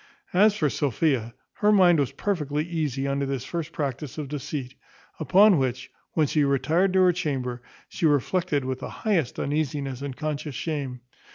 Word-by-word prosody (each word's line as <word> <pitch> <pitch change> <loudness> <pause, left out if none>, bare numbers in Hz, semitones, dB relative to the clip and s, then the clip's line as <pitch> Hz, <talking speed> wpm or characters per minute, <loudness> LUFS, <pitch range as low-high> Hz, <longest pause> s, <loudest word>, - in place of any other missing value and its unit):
As 205 +3 +5
for 150 - +2
Sophia, 135 -4 0 0.2
her 210 0 +3
mind 180 -5 +5
was 140 - +1
not 135 - -21
perfectly 150 -7 -1
easy 150 -5 -2
under 140 0 -1
this 135 -2 -3
first 165 0 -4
practice 140 0 -4
of 150 -3 -5
deceit; 140 -2 -5 0.5
upon 185 +4 +5
which, 130 -1 -2 0.2
when 155 - +3
she 150 +1 +1
retired 145 +7 +2
to 190 - +4
her 180 -1 +5
chamber, 130 -8 -3 0.3
she 165 - 0
reflected 145 0 +1
with 130 0 -3
the - - -6
highest 180 - -1
uneasiness 140 -3 -2
and 140 -2 -5
conscious 150 -2 -4
shame. 135 -5 -4
145 Hz, 170 wpm, -25 LUFS, 135-165 Hz, 0.5 s, As